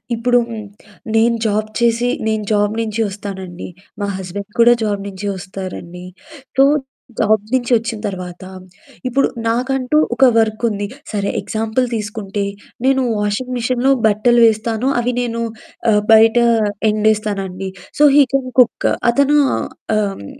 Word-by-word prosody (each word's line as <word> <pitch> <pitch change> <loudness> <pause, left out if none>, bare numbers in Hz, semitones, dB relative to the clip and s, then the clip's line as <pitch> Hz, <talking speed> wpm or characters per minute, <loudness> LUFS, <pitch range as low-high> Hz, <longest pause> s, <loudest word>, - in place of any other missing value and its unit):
ఇప్పుడు 245 +2 +2
హ్మ్. 220 -2 -6 0.5
నేను 230 +1 +3
జాబ్ 215 0 0
చేసి 235 0 +2 0.2
నేను 220 -1 0
జాబ్ 205 0 +1
నుంచి 220 0 -3
వస్తానండి. 190 -3 -7 0.3
మా 200 - -1
హస్బెండ్ 195 +2 -7
కూడా 235 +1 +7
జాబ్ 205 -2 -1
నుంచి 200 0 -7
వస్తారండి. 180 -1 -8 0.5
సో, 270 - +7 0.6
జాబ్ 215 -1 +2
నుంచి 255 -1 0
వచ్చిన 230 0 -2
తర్వాత, 180 -2 -7 0.6
ఇప్పుడు 270 +2 +2 0.2
నాకంటూ 255 +4 0 0.2
ఒక 265 - +5
వర్క్ 220 0 0
ఉంది. 205 -1 -3 0.2
సరే 200 -2 -1
ఎగ్జాంపుల్ 225 +3 -1
తీసుకుంటే, 210 -2 -4 0.4
నేను 265 0 +3 0.2
వాషింగ్ 210 +5 -2
మిషిన్‌లో 250 +2 +1 0.2
బట్టలు 235 +3 +3
వేస్తాను. 225 +2 -1
అవి 245 +1 -1
నేను 235 -1 -3 0.5
ఆహ్, 210 -1 +3
బయట 225 +1 +6 0.5
ఎండేస్తానండి. 210 -3 -1 0.3
సో, - - +5
హీ 290 - +8
కెన్ 265 -2 0
కుక్కు 245 -2 +3 0.2
అతను 280 +4 +3 0.2
ఆహ్, - - -3 0.5
హ్మ్. 100 - -10
220 Hz, 130 wpm, -18 LUFS, 205-240 Hz, 0.6 s, హీ